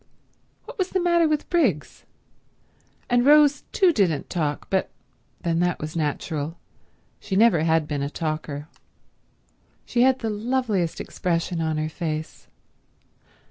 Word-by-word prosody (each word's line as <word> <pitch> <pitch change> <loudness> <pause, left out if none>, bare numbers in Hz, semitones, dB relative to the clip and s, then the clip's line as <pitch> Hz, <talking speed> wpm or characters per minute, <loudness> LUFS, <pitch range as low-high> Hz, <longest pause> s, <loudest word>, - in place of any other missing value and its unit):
What - - -11
was 370 -1 0
the 380 - 0
matter 345 -2 +3
with 305 -1 -1
Briggs? 250 - 0 1.0
And 245 0 +3
Rose 290 +1 +5
too 370 -4 +4
didn't 175 - 0
talk, 150 -5 -2
but 190 -1 +1 0.5
then 165 -1 0
that 175 0 0
was 155 +2 -6
natural. 155 0 -3 0.6
She 190 - -4
never 205 -6 +5
had 160 -2 +2
been 145 -2 -2
a 140 - -2
talker. 155 -2 -4 1.2
She 240 - 0
had 260 +1 +4
the 225 -4 -3
loveliest 215 -5 -1
expression 170 -1 -2
on 160 -1 -1
her 155 0 -1
face. 155 -1 -5
175 Hz, 135 wpm, -24 LUFS, 155-255 Hz, 1.2 s, Rose